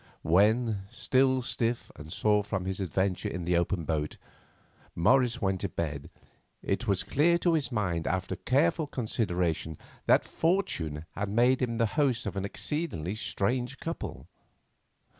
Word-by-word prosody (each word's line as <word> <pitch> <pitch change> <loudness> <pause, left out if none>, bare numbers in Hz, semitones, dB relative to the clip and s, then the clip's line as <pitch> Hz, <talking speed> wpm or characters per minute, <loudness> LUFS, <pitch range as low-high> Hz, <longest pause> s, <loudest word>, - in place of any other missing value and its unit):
When, 105 +4 +3
still 130 +1 +2
stiff 120 -1 -1
and 75 +2 -10
sore 105 +2 +2
from 95 -2 -3
his 95 0 -1
adventure 95 0 -1
in 90 0 -4
the 90 0 +2
open 85 0 0
boat, 75 -1 -2 0.8
Morris 125 +6 +3
went 95 -1 0
to 100 - -1
bed, 75 -5 -4 0.5
it 110 +5 -1
was 100 -2 +1
clear 170 +5 +3
to 170 -1 +2
his 150 -4 +1
mind 90 -8 -1
after 95 0 -1
careful 160 +3 +1
consideration 90 - -1 0.3
that - - +5
fortune 85 - -1
had 100 0 -3
made 120 +5 +3
him 115 -2 0
the 115 - +3
host 125 0 +1
of 100 - -3
an 95 0 -2
exceedingly 100 - -2
strange 120 +5 -1
couple. 165 +1 -5
105 Hz, 145 wpm, -29 LUFS, 90-130 Hz, 0.8 s, that